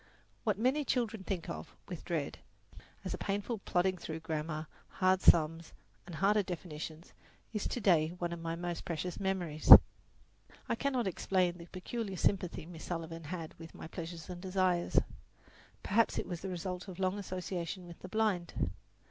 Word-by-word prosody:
What 210 -3 +1
many 260 +7 +2
children 230 -6 0
think 185 -4 -3
of 80 0 -6
with - - -6
dread, - - -2 0.7
as - - -2
a - - -4
painful 205 +3 -2
plodding 185 -1 +1
through 160 -1 -5
grammar, 155 -1 -3 0.3
hard 185 0 +3
sums 165 0 +4 0.3
and 175 - -7
harder 205 +5 +4
definitions, 165 -3 -6 0.4
is 210 - -1
to - - -2
day 170 -7 +4
one 175 -1 -2
of 170 - -5
my 165 0 -3
most 175 0 -4
precious 175 0 -3
memories. 180 -6 -1 1.0
I - - +1
cannot 255 0 0
explain 180 -1 +1
the 170 - -10
peculiar 195 +2 -4
sympathy 180 -5 0
Miss 165 -1 -9
Sullivan 165 -1 -4
had 165 0 -5
with 165 0 -10
my - - -8
pleasures 165 0 -6
and 180 -1 -7
desires. 185 -2 +1 0.9
Perhaps 225 +3 +3
it - - -1
was 175 -3 -5
the 190 - -4
result 180 +1 -4
of 185 -2 -8
long 190 +1 0
association 185 -1 -4
with 170 -1 -11
the 185 - -9
blind. 190 - 0
180 Hz, 165 wpm, -33 LUFS, 165-195 Hz, 1.0 s, sums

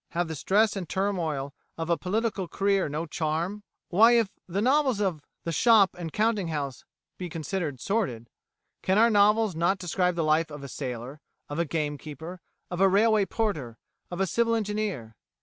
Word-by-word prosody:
Have 175 0 0
the 160 - -4
stress 205 +8 +2
and 185 -4 -5
turmoil 165 -8 -1 0.2
of 165 +1 -2
a - - +5
political 200 +1 -2
career 195 -1 +1
no 155 +3 -3
charm? 165 +6 -2 0.3
Why, 225 +6 +6
if 230 -4 +3 0.2
novels 255 - +2
of 185 -7 -1 0.2
the 165 - -2
shop 215 +1 +5
and 170 -2 -6
counting 215 -2 +1
house 145 -5 -4 0.4
be 180 -1 -4
considered 160 -3 -3
sordid, 160 - -1 0.5
can 190 +1 +1
our 230 +2 +5
novels 210 -1 +4
not 170 +4 +2
describe 180 0 0
the 170 - 0
life 155 +1 +2
of 145 -2 -9
a - - -6
sailor, 130 +1 -6 0.3
of 145 +3 -4
a 170 - +2
game 150 -2 -2
keeper, 160 +4 -8 0.3
of 175 +1 -2
a 195 - +6
railway 210 +1 +3
porter, 155 - -2 0.3
of 175 - -6
a 195 - +3
civil 230 +5 +1
engineer? 210 - -3
180 Hz, 175 wpm, -27 LUFS, 155-210 Hz, 0.5 s, Why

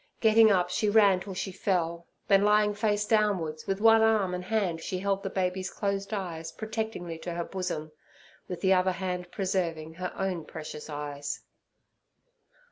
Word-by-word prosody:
Getting 220 0 +6
up, 180 -3 +2
she 210 +3 +1
ran 205 -3 +5
till 190 0 -7
she 190 - -3
fell; 170 -3 -1 0.2
then, 195 0 +5
lying 210 0 +4
face 205 0 0
downwards, 200 -8 +1
with 195 0 -1
one 225 +1 +6
arm 215 -4 +3
and 180 0 -3
hand 185 -6 0
she 185 - -3
held 195 +1 0
the 195 - -3
baby's 185 0 -1
closed 200 0 -2
eyes 170 -6 -4
protectingly 220 -4 -4
to 175 +1 -5
her 170 - -1
bosom, 175 -4 -4 0.6
with 180 -2 -6
the 190 0 +4
other 185 0 +3
hand 180 -1 -4
preserving 175 -5 -2
her 180 +2 -4
own 185 -4 -2
precious 155 -1 -8
eyes. 145 -1 -5
185 Hz, 165 wpm, -28 LUFS, 170-205 Hz, 0.6 s, Getting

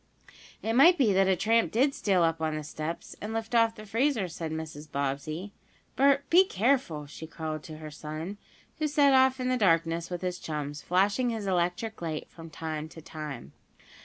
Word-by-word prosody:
"It 225 - 0
might 330 +9 +7
be 235 -9 +3
that 190 0 +4
a 190 - +4
tramp 225 +5 +2
did 270 +5 +3
steal 190 -8 +2
up 165 -1 +1
on 155 -1 0
the 155 - -4
steps, 155 +3 -6
and 215 +2 -4
lift 225 +1 -4
off 230 -1 +4
the 215 - -10
freezer," 230 -1 +1
said 165 -1 -5
Mrs. 155 -1 -6
Bobbsey. 140 +7 -3 0.4
"Bert, 275 +1 +3
be 360 +3 +8
careful," 220 - 0
she 150 +2 -9
called 155 -2 -5
to 155 -1 -8
her 155 -1 -8
son, 155 +6 -6 0.4
who 310 - +1
set 285 -2 +4
off 260 0 +4
in 255 - -1
the 255 - +2
darkness 165 -4 +2
with 180 0 -5
his 180 -1 -2
chums, 150 -1 -4
flashing 200 +7 +2
his 225 -3 -3
electric 180 +4 -1
light 160 -2 -4
from 165 -1 -11
time 155 0 -5
to 165 - -12
time. 150 - -7
180 Hz, 190 wpm, -28 LUFS, 155-230 Hz, 0.4 s, be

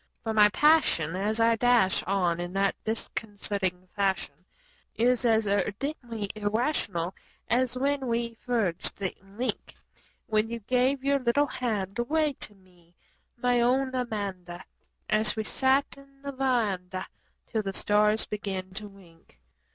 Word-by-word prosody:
For 225 -1 -2
my 210 -1 +6
passion 210 - +3
as 210 +4 -1
I 230 0 +4
dash 240 -5 +4
on 180 -3 +1
in 175 +1 -4
that 195 0 +2
disconcerting 200 -4 -3
fashion 195 -6 0 0.6
Is 245 +2 +2
as 220 -2 +3
ardently 215 - -2
irrational 205 - -1 0.3
as 250 +1 +1
when 275 0 0
we 235 0 -1
forged 220 -9 0
the 195 -2 -2
link 200 +6 -5 0.5
When 215 -1 +1
you 235 - -3
gave 255 +4 +1
your 280 0 +2
little 255 +3 +2
hand 210 -7 -3
away 300 +4 +1
to 210 - -7
me, 180 -3 -25 0.4
my 245 0 +2
own 260 +2 +2
Amanda 200 -8 -4 0.4
As 215 +1 +3
wo 220 - 0
sat 265 +5 +2
'n 275 0 -19
the 280 - -4
veranda 215 -9 -1 0.4
till 220 - -1
the 195 -2 -3
stars 210 +2 +3
began 190 -3 -4
to 210 +2 -6
wink. 170 - -20
220 Hz, 135 wpm, -28 LUFS, 195-250 Hz, 0.6 s, my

